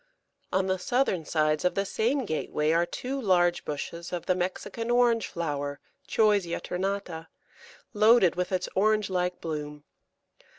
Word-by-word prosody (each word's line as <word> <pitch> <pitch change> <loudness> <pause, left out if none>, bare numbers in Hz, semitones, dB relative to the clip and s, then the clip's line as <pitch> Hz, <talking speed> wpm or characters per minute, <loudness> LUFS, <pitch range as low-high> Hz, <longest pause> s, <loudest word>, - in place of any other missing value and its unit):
On 190 0 +1
the 190 0 0
southern 190 - 0
sides 155 0 +1
of 180 - +1
the 195 - 0
same 245 +7 0
gateway 155 -3 -1
are 170 +1 +2
two 265 +9 -4
large 175 -4 +2
bushes 170 +3 -5
of 175 -2 -4
the 185 - +2
Mexican 185 +6 -3
Orange 240 -2 +3
flower 145 -4 -3 0.3
(Choisya 205 -6 +2
ternata), 180 -3 -3 0.7
loaded 215 -4 +5
with 180 +1 -2
its 185 - -1
orange 210 0 +2
like 180 0 -1
bloom. 150 -2 -5
180 Hz, 140 wpm, -27 LUFS, 165-210 Hz, 0.7 s, loaded